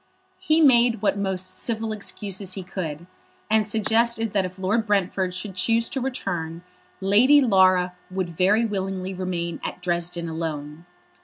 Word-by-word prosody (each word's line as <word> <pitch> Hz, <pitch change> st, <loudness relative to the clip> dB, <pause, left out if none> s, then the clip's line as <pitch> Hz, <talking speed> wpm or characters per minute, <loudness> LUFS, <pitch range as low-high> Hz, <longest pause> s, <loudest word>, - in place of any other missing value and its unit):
He 325 Hz, -3 st, +2 dB
made 240 Hz, -6 st, +4 dB
what 200 Hz, -, +2 dB
most 190 Hz, -2 st, -2 dB
civil 225 Hz, -1 st, -3 dB
excuses 200 Hz, -2 st, -4 dB
he 190 Hz, -, -6 dB
could, 170 Hz, -4 st, -5 dB, 0.5 s
and 220 Hz, -1 st, +3 dB
suggested 225 Hz, +1 st, +1 dB
that 195 Hz, -2 st, +2 dB
if 185 Hz, +1 st, -8 dB
Lord 210 Hz, +4 st, 0 dB
Brentford 190 Hz, -2 st, 0 dB
should 190 Hz, +1 st, -4 dB
choose 230 Hz, +5 st, +2 dB
to 270 Hz, -, -3 dB
return, 175 Hz, -10 st, -4 dB, 0.4 s
Lady 225 Hz, +10 st, +5 dB
Laura 185 Hz, -7 st, +4 dB, 0.2 s
would 185 Hz, -2 st, -3 dB
very 195 Hz, +7 st, +2 dB
willingly 190 Hz, -2 st, -3 dB
remain 180 Hz, -2 st, -4 dB
at -, -, -5 dB
Dresden 175 Hz, -1 st, -1 dB
alone. 160 Hz, 0 st, -5 dB
190 Hz, 145 wpm, -24 LUFS, 180-220 Hz, 0.5 s, Lady